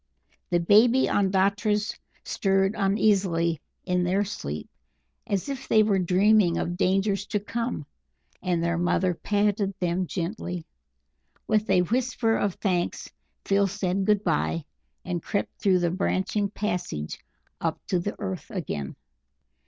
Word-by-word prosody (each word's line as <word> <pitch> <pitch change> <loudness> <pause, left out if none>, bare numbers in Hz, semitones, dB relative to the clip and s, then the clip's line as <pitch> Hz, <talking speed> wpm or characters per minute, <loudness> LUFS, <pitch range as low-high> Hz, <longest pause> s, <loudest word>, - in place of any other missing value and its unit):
The 175 - +2
baby 225 +9 +5
Ondatras 200 +2 +1 0.3
stirred 195 0 +1
uneasily 195 -6 +2 0.2
in 180 -1 +1
their 190 +3 +1
sleep 205 +3 -5 0.6
as 200 -1 -1
if 270 -1 -5
they 215 - +5
were 205 -2 +2
dreaming 185 0 +4
of 175 - -2
dangers 195 +2 +1
to 210 - 0
come, 230 - -3 0.6
and 175 -2 0
their 170 0 0
mother 180 +1 +2
patted 205 +1 0
them 180 +1 0
gently. 175 -1 -4 0.8
With 215 0 +1
a 185 -2 +4
whisper 235 +1 +1
of 200 -3 0
thanks 180 -4 -1 0.3
Phil 200 0 +3
said 195 -1 -1
good 210 0 +3
bye, 165 -2 0 0.4
and 175 -2 -2
crept 200 - -3
through 195 -4 +4
the 175 -1 +1
branching 195 +2 0
passages 180 - -3 0.4
up - - -1
to 180 - 0
the 205 +4 -3
earth 190 +2 -5
again. 140 - -4
195 Hz, 130 wpm, -26 LUFS, 180-210 Hz, 0.8 s, baby